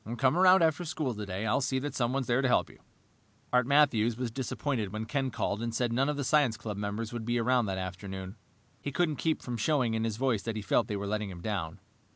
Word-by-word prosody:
"Come 130 Hz, +3 st, +3 dB
around 185 Hz, 0 st, +6 dB
after 160 Hz, +2 st, +2 dB
school 155 Hz, -5 st, -2 dB
today. 105 Hz, -1 st, -4 dB
I'll 110 Hz, +5 st, +2 dB
see 130 Hz, 0 st, 0 dB
that 145 Hz, +2 st, -3 dB
someone 130 Hz, +2 st, 0 dB
is -, -, -12 dB
there 125 Hz, +2 st, +2 dB
to 135 Hz, -, +2 dB
help 125 Hz, -, +2 dB
you." -, -, -20 dB, 0.7 s
Art 125 Hz, -1 st, +4 dB
Matthews 125 Hz, -6 st, +3 dB
was 125 Hz, -2 st, -3 dB
disappointed 125 Hz, -3 st, -2 dB
when 110 Hz, +1 st, -4 dB
Ken 135 Hz, +3 st, -1 dB
called 105 Hz, -3 st, -2 dB
and 115 Hz, -1 st, -3 dB
said 120 Hz, -1 st, 0 dB
none 135 Hz, +4 st, +2 dB
of 150 Hz, -, -1 dB
the 140 Hz, -, -1 dB
science 135 Hz, -5 st, +3 dB
club 105 Hz, -2 st, -5 dB
members 105 Hz, +3 st, -4 dB
would 120 Hz, -2 st, -4 dB
be 120 Hz, +1 st, 0 dB
around 120 Hz, -1 st, +2 dB
that 95 Hz, -1 st, -2 dB
afternoon. 95 Hz, +1 st, -6 dB, 0.5 s
He 145 Hz, -, -4 dB
couldn't 155 Hz, -1 st, 0 dB
keep 160 Hz, -1 st, 0 dB
from 120 Hz, -1 st, -4 dB
showing 125 Hz, -1 st, +1 dB
in 110 Hz, 0 st, 0 dB
his 110 Hz, -2 st, -2 dB
voice 125 Hz, -5 st, +1 dB
that 115 Hz, +1 st, -4 dB
he 110 Hz, -, -4 dB
felt 95 Hz, -, +2 dB
they 105 Hz, -, -2 dB
were 100 Hz, -, -4 dB
letting 105 Hz, 0 st, -2 dB
him 90 Hz, -2 st, -9 dB
down. 90 Hz, -6 st, -3 dB
120 Hz, 245 wpm, -30 LUFS, 105-135 Hz, 0.7 s, around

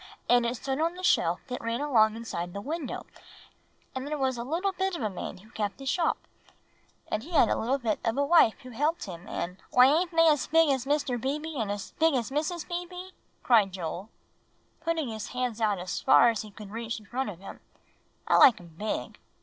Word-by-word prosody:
and 245 Hz, -1 st, +4 dB
it 235 Hz, -, -2 dB
stood 270 Hz, +4 st, -2 dB
on 335 Hz, +2 st, 0 dB
the 365 Hz, -, -9 dB
shelf 175 Hz, -, +2 dB
that 250 Hz, -2 st, -5 dB
ran 230 Hz, +1 st, -2 dB
along 225 Hz, -7 st, +3 dB
inside 175 Hz, -7 st, -5 dB
the 200 Hz, -, -4 dB
window; 295 Hz, +5 st, -5 dB, 0.9 s
and 260 Hz, +1 st, -4 dB
there 300 Hz, +1 st, -2 dB
was 265 Hz, -2 st, 0 dB
a 235 Hz, -, -4 dB
little 340 Hz, +9 st, -1 dB
bit 380 Hz, 0 st, -2 dB
of 275 Hz, -, -4 dB
a 215 Hz, -, -1 dB
man 185 Hz, -, -6 dB
who 215 Hz, +5 st, -18 dB
kept 210 Hz, -4 st, -3 dB
the 275 Hz, -, -10 dB
shop, 330 Hz, +4 st, +1 dB, 0.9 s
and 215 Hz, -, -1 dB
he 330 Hz, +9 st, -11 dB
had 280 Hz, -8 st, +5 dB
a -, -, +2 dB
little 255 Hz, +5 st, 0 dB
bit 230 Hz, -5 st, -1 dB
of 225 Hz, +2 st, 0 dB
a 285 Hz, -, +2 dB
wife 305 Hz, -8 st, +5 dB
who 255 Hz, -, -10 dB
helped 300 Hz, +8 st, 0 dB
him, 180 Hz, 0 st, -8 dB
and" 180 Hz, +2 st, -4 dB
"Why 250 Hz, -, +7 dB
ain't 350 Hz, +2 st, +1 dB
they 335 Hz, -, -12 dB, 0.3 s
big 325 Hz, -1 st, +5 dB
as 260 Hz, -1 st, -2 dB
Mr. 280 Hz, -5 st, 0 dB
Beebe, 300 Hz, +4 st, -3 dB
and 220 Hz, -6 st, -2 dB, 0.3 s
big 320 Hz, -2 st, +4 dB
as 245 Hz, 0 st, -1 dB
Mrs. 315 Hz, +4 st, -2 dB
Beebe?" 360 Hz, +1 st, -6 dB, 0.3 s
cried 215 Hz, -6 st, +4 dB
Joel, 180 Hz, +3 st, -5 dB, 0.7 s
putting 325 Hz, -3 st, -1 dB
his 220 Hz, -2 st, -5 dB
hands 250 Hz, -3 st, -3 dB
out 210 Hz, -2 st, +2 dB
as 180 Hz, 0 st, -4 dB
far 235 Hz, -, +6 dB
as 225 Hz, -, -3 dB
he 215 Hz, -, -9 dB
could 205 Hz, -1 st, -11 dB
reach 230 Hz, 0 st, -4 dB
in 215 Hz, -, -17 dB
front 255 Hz, +4 st, -3 dB
of 190 Hz, -, -8 dB
him; 195 Hz, +2 st, -10 dB, 0.7 s
"I -, -, +4 dB
like 250 Hz, -, +7 dB
'em 170 Hz, -2 st, -15 dB
big. 215 Hz, 0 st, -3 dB
250 Hz, 215 wpm, -28 LUFS, 215-305 Hz, 0.9 s, Why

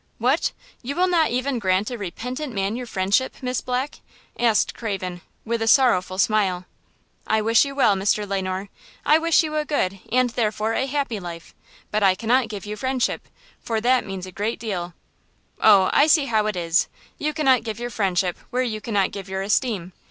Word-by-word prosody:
"What! 255 Hz, +7 st, +1 dB, 0.3 s
you 270 Hz, +3 st, -4 dB
will 365 Hz, +1 st, +3 dB
not 335 Hz, -5 st, +3 dB
even 255 Hz, +1 st, -1 dB
grant 190 Hz, +2 st, +1 dB
a -, -, -3 dB
repentant 250 Hz, -, -5 dB
man 195 Hz, +2 st, -1 dB
your 250 Hz, 0 st, -5 dB
friendship, 200 Hz, +5 st, 0 dB
Miss 250 Hz, -1 st, -2 dB
Black?" 255 Hz, +3 st, -3 dB, 0.4 s
asked 230 Hz, -3 st, +2 dB
Craven, 185 Hz, -5 st, -4 dB, 0.2 s
with 230 Hz, 0 st, -1 dB
a 225 Hz, -, 0 dB
sorrowful 220 Hz, -9 st, +4 dB
smile. 195 Hz, -3 st, +1 dB, 0.6 s
"I 220 Hz, -, +2 dB
wish 230 Hz, +5 st, +4 dB
you 275 Hz, 0 st, -6 dB
well, 245 Hz, -7 st, +4 dB
Mr. 205 Hz, +2 st, 0 dB
Le 195 Hz, -1 st, -1 dB
Noir. 185 Hz, +1 st, -4 dB, 0.4 s
I 305 Hz, +1 st, +5 dB
wish 330 Hz, 0 st, +3 dB
you 310 Hz, -1 st, -4 dB
a 305 Hz, -, +1 dB
good 195 Hz, -11 st, -1 dB
and, 250 Hz, 0 st, +2 dB
therefore, 220 Hz, -1 st, -1 dB
a 265 Hz, -, 0 dB
happy 275 Hz, -6 st, -2 dB
life; 170 Hz, -2 st, -9 dB, 0.4 s
but 215 Hz, -, 0 dB
I 190 Hz, -2 st, +4 dB
cannot 235 Hz, +4 st, +2 dB
give 205 Hz, -2 st, -6 dB
you 210 Hz, 0 st, -5 dB
friendship, 260 Hz, +3 st, -1 dB, 0.3 s
for 225 Hz, -1 st, -2 dB
that 250 Hz, +3 st, +3 dB
means 190 Hz, -2 st, -6 dB
a 185 Hz, -, -9 dB
great 210 Hz, +5 st, -2 dB
deal." 180 Hz, -6 st, -4 dB, 0.7 s
"Oh, 200 Hz, -3 st, +6 dB
I 290 Hz, -, +5 dB
see 310 Hz, -3 st, +4 dB
how 220 Hz, -4 st, +1 dB
it 210 Hz, -, -1 dB
is! 170 Hz, -1 st, +1 dB, 0.3 s
You 305 Hz, -, 0 dB
cannot 270 Hz, -5 st, +3 dB
give 220 Hz, -1 st, -5 dB
your 240 Hz, 0 st, -4 dB
friendship 185 Hz, -4 st, 0 dB
where 255 Hz, +1 st, 0 dB
you 215 Hz, -4 st, -3 dB
cannot 205 Hz, -3 st, 0 dB
give 195 Hz, -2 st, -8 dB
your 190 Hz, 0 st, -2 dB
esteem. 200 Hz, -4 st, 0 dB
220 Hz, 195 wpm, -23 LUFS, 195-255 Hz, 0.7 s, Oh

